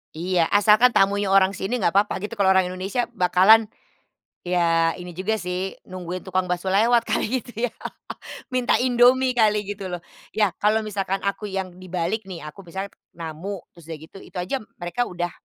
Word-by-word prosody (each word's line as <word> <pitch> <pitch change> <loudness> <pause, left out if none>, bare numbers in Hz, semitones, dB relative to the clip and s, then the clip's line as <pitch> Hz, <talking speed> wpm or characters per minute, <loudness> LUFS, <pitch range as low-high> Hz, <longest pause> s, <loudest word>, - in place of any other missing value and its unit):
Iya. 170 0 +1
Asalkan 210 +4 +5
tamunya 200 -2 +2
orang 195 0 +4
sini, 200 +6 -2
nggak 175 -6 +1
papa 200 +2 +2
gitu. 210 +4 -6
Kalau 200 -4 +2
orang 190 -1 +4
Indonesia 190 +7 -2
bakalan, 195 +3 +5 0.8
ya 165 -2 +2
ini 180 0 -9
juga 215 +3 -1
sih, 180 +1 -3 0.2
nungguin 185 0 -5
tukang 185 -1 -1
baso 180 +1 -2
lewat 230 +5 +4
kali 250 +2 -1
gitu 235 +1 -3
ya? 235 - -6 0.8
Minta 250 -1 +2
Indomie 255 +1 +4
kali, 210 -2 +3
gitu 200 -2 -5
loh. 175 -1 -5 0.3
Ya, 210 -5 +2
kalau 215 +1 +3
misalkan 195 -2 -2
aku 200 +1 -2
yang 190 -2 -4
dibalik 185 +4 -2
nih, 165 -4 -7
aku 150 +6 -9
misalnya 190 +3 -6 0.2
namu, 165 +5 -5 0.2
terus 170 -2 -16
udah 160 - -5
gitu 160 +4 -13
itu - - -11
aja 185 +10 -2
m 215 - -15 0.2
mereka 175 +8 -1
udah 175 -1 -3
195 Hz, 180 wpm, -23 LUFS, 180-215 Hz, 0.8 s, Asalkan